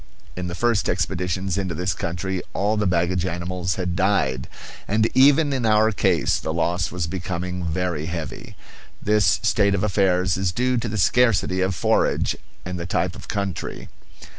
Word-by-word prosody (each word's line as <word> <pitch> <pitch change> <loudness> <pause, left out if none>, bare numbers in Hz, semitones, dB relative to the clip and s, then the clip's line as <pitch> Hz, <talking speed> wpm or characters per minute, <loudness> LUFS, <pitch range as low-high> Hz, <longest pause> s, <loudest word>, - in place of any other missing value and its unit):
In 90 -1 -4
the 85 - -5
first 115 0 +1
expeditions 95 +1 -1
into 95 -4 -3
this 90 +4 -1
country 90 +2 -3
all 105 +3 +1
the 105 -2 +1
baggage 90 0 +1
animals 90 +1 -2
had 90 -2 -2
died; 80 -10 +1 0.4
and 110 +2 +2
even 145 +2 +5
in 130 -2 -1
our 110 0 +4
case 95 -6 +1
the 80 - -3
loss 85 +1 0
was 90 -2 -2
becoming 90 +1 -4
very 80 -2 -2
heavy. 85 -2 -6 0.4
This 105 0 +3
state 100 -2 +3
of 95 - -1
affairs 95 -3 +2
is 95 -2 0
due 125 +6 +1
to 115 0 -2
the 110 - -3
scarcity 100 -2 +3
of 95 0 0
forage - - +1 0.3
and 90 0 -4
the 85 - -4
type 85 0 -1
of - - -11
country. 100 -4 -4
90 Hz, 165 wpm, -23 LUFS, 90-100 Hz, 0.4 s, even